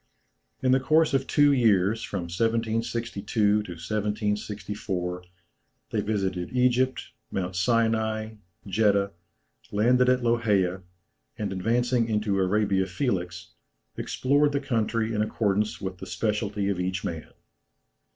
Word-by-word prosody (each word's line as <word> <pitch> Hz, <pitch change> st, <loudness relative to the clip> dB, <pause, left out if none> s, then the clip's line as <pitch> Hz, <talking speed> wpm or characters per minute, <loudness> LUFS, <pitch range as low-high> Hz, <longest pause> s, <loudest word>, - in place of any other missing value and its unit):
In 130 Hz, -, +3 dB
the 130 Hz, -, +5 dB
course 155 Hz, +3 st, +3 dB
of 135 Hz, -1 st, +1 dB
two 145 Hz, 0 st, +4 dB
years, 110 Hz, -4 st, +3 dB
from 100 Hz, -4 st, -4 dB
1762 115 Hz, +3 st, -1 dB, 0.2 s
to 105 Hz, 0 st, +5 dB, 0.2 s
1764, 105 Hz, -1 st, -3 dB, 0.7 s
they -, -, 0 dB
visited 95 Hz, -4 st, -2 dB
Egypt, 125 Hz, +1 st, +1 dB, 0.2 s
Mount 95 Hz, -1 st, -3 dB
Sinai, 110 Hz, +1 st, +1 dB, 0.3 s
Jeddah, 100 Hz, -1 st, +2 dB, 0.6 s
landed 125 Hz, +5 st, +3 dB
at 125 Hz, -1 st, +2 dB
Loheia, 105 Hz, -6 st, +1 dB, 0.6 s
and 100 Hz, -2 st, -3 dB
advancing 115 Hz, +4 st, +1 dB
into 105 Hz, -2 st, 0 dB
Arabia 95 Hz, 0 st, +1 dB
Felix, 90 Hz, -4 st, -3 dB, 0.4 s
explored 145 Hz, +2 st, +1 dB
the 140 Hz, -, +1 dB
country 115 Hz, -3 st, -1 dB
in 105 Hz, -, 0 dB
accordance 105 Hz, -1 st, 0 dB
with 95 Hz, -2 st, -5 dB
the -, -, -8 dB
speciality 105 Hz, -2 st, -1 dB
of 95 Hz, -3 st, -1 dB
each 95 Hz, +1 st, -2 dB
man. 80 Hz, -2 st, -5 dB
105 Hz, 115 wpm, -26 LUFS, 95-115 Hz, 0.7 s, the